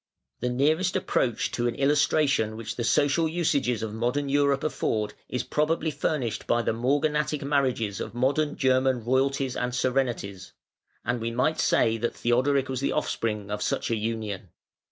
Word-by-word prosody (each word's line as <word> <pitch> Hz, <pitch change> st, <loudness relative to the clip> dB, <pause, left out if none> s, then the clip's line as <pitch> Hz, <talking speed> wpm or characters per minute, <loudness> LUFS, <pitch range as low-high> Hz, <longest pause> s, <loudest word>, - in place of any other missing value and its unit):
The 125 Hz, -, -1 dB
nearest 155 Hz, +9 st, +1 dB
approach 130 Hz, -, 0 dB
to 120 Hz, 0 st, 0 dB
an 120 Hz, -, -2 dB
illustration 140 Hz, -5 st, +2 dB
which 115 Hz, -1 st, -5 dB
the 120 Hz, -, -3 dB
social 145 Hz, +7 st, +2 dB
usages 140 Hz, -9 st, 0 dB
of 110 Hz, -1 st, -4 dB
modern 125 Hz, +5 st, -1 dB
Europe 140 Hz, -1 st, +2 dB
afford, 110 Hz, -8 st, -1 dB, 0.2 s
is 125 Hz, -, -2 dB
probably 155 Hz, +1 st, 0 dB
furnished 140 Hz, -4 st, -2 dB
by 120 Hz, 0 st, +2 dB
the -, -, 0 dB
"morganatic 145 Hz, +4 st, 0 dB
marriages" 130 Hz, -8 st, 0 dB
of 110 Hz, -, -6 dB
modern 145 Hz, +4 st, +1 dB
German 130 Hz, -2 st, +2 dB
royalties 135 Hz, +1 st, +1 dB
and 125 Hz, 0 st, -2 dB
serenities: 120 Hz, -8 st, -1 dB, 0.5 s
and 120 Hz, -1 st, -1 dB
we 115 Hz, -, -1 dB
might 125 Hz, +7 st, 0 dB
say 115 Hz, 0 st, +3 dB
that 120 Hz, +1 st, -2 dB
Theodoric 130 Hz, +3 st, +2 dB
was 130 Hz, -1 st, -3 dB
the 140 Hz, -, 0 dB
offspring 105 Hz, -3 st, -2 dB
of 105 Hz, 0 st, -3 dB
such -, -, -1 dB
an 115 Hz, -, 0 dB
union. 105 Hz, -4 st, -4 dB
130 Hz, 160 wpm, -26 LUFS, 115-145 Hz, 0.5 s, say